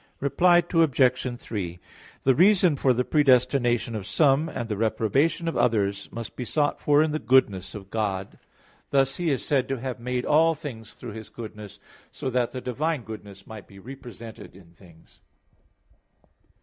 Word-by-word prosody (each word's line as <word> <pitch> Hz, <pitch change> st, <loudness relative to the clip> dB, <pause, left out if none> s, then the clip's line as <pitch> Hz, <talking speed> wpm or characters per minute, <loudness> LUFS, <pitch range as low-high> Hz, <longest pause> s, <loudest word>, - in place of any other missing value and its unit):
Reply 175 Hz, +5 st, +4 dB
Obj. 130 Hz, -6 st, +2 dB
3: 90 Hz, -8 st, -5 dB, 0.4 s
The 135 Hz, -, +4 dB
reason 180 Hz, +1 st, +4 dB
for 135 Hz, -1 st, +2 dB
the 125 Hz, 0 st, 0 dB
predestination 125 Hz, -4 st, +2 dB
of 105 Hz, -3 st, -5 dB
some, 145 Hz, +6 st, +2 dB
and 120 Hz, -, -5 dB
reprobation 115 Hz, -, 0 dB
of 165 Hz, -, -2 dB
others, 100 Hz, -5 st, 0 dB
must 115 Hz, -1 st, -7 dB
be 125 Hz, -, -4 dB
sought 145 Hz, +5 st, -1 dB
for 145 Hz, +1 st, +4 dB
in 155 Hz, -, -1 dB
the 155 Hz, -, -2 dB
goodness 105 Hz, -10 st, +2 dB
of 100 Hz, -2 st, -10 dB
God. 100 Hz, -3 st, -3 dB, 0.5 s
Thus 135 Hz, -1 st, +2 dB
He 175 Hz, -2 st, -1 dB
is 135 Hz, -4 st, -1 dB
said 135 Hz, -3 st, +1 dB
to 135 Hz, -2 st, -2 dB
have 130 Hz, 0 st, -5 dB
made 125 Hz, +1 st, -3 dB
all 160 Hz, +2 st, +4 dB
things 125 Hz, -8 st, -9 dB
through 120 Hz, -, -8 dB
His 110 Hz, 0 st, -9 dB
goodness, 105 Hz, -3 st, -9 dB, 0.3 s
so 130 Hz, -, -5 dB
that 125 Hz, -1 st, +1 dB
the 130 Hz, -, -7 dB
divine 145 Hz, +3 st, -2 dB
goodness 105 Hz, -3 st, -10 dB
might 110 Hz, -2 st, -10 dB
be 100 Hz, -, -16 dB
represented 115 Hz, -5 st, -11 dB
in 90 Hz, -3 st, -17 dB
things. 85 Hz, -1 st, -20 dB
125 Hz, 160 wpm, -25 LUFS, 110-140 Hz, 0.5 s, Reply